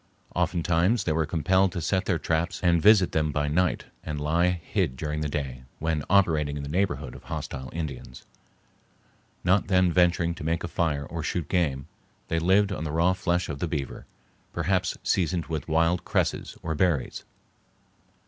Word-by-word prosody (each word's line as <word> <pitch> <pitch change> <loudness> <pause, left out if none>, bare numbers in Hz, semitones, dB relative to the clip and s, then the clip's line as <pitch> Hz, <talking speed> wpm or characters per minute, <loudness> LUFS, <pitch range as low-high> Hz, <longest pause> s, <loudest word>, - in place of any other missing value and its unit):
Oftentimes 85 +6 +1
they 80 - 0
were 80 0 +1
compelled 95 +4 +2
to - - -2
set 95 +4 0
their 90 - +1
traps 85 +3 -1
and 85 -2 +4
visit 105 -2 +6
them 75 -1 +1
by 75 0 0
night 90 +4 +1 0.2
and 75 -2 -4
lie 80 +4 +2
hid 85 -7 -1
during 75 +1 -3
the 75 - -1
day, 70 -4 -4 0.2
when 80 -2 -1
operating 80 -7 +3
in 70 - -5
the 70 - -6
neighborhood 95 +4 -1
of - - -12
hostile 65 -1 -5
Indians. 70 -6 -6 1.2
Not 90 +2 +3
then 90 -2 +3
venturing 85 -1 +3
to 85 - -9
make 80 +1 -1
a - - -2
fire 80 -5 -1
or 85 +3 -5
shoot 80 0 -2
game, 70 -8 0 0.4
they 80 - +1
lived 95 +4 +3
on 90 - -3
the 75 - -3
raw 85 +4 +3
flesh 90 -1 0
of 70 -2 -5
the 85 - -1
beaver, 75 -5 -4 0.5
perhaps 95 0 0
seasoned 90 -2 0
with 80 -3 -4
wild 85 +2 +2
cresses - - -1
or 80 - -2
berries. 80 -4 0
85 Hz, 175 wpm, -26 LUFS, 75-90 Hz, 1.2 s, visit